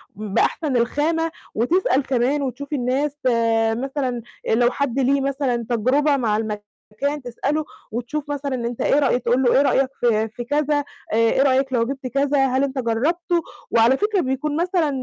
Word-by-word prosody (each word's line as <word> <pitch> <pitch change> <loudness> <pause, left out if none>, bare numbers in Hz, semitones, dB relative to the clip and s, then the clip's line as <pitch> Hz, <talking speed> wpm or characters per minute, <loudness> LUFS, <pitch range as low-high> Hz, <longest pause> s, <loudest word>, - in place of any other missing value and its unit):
ب 210 -1 -6
بأحسن 285 -6 +1
الخامة، 320 +7 0 0.2
وتسأل 270 - +2
كمان 265 +3 +1
وتشوف 280 +2 -5
الناس 275 +3 -1
آآ 225 -2 +2
مثلًا 260 -1 -2 0.3
لو 240 +2 +3
حد 275 -1 -1
ليه 275 +1 +2
مثلًا 265 -4 -1
تجربة 275 +5 +2
مع 215 -4 +1
المكان 215 +6 -4
تسألُه، 280 +5 -2 0.3
وتشوف 280 +6 -4
مثلًا 280 -2 -2
أنت 235 -1 -4
إيه 290 - +3
رأيك 250 -3 +1
تقول 245 +3 +2
لُه: 245 - +4
"إيه - - +6
رأيك 270 -1 +2
في 220 -2 +2
في 240 +2 -7
كذا، 290 +2 0 0.3
إيه 230 +3 +3
رأيك 265 -1 +2
لو 230 -1 +2
جبت 270 0 -5
كذا؟ 275 +1 +2
هل 265 +1 +1
أنت 270 -1 -2
جرّبتُه،" 330 +9 0 0.3
وعلى 235 +4 +4
فكرة 420 -3 +1
بيكون 280 +3 -2
مثلًا 350 -4 +1
265 Hz, 165 wpm, -22 LUFS, 235-290 Hz, 0.3 s, إيه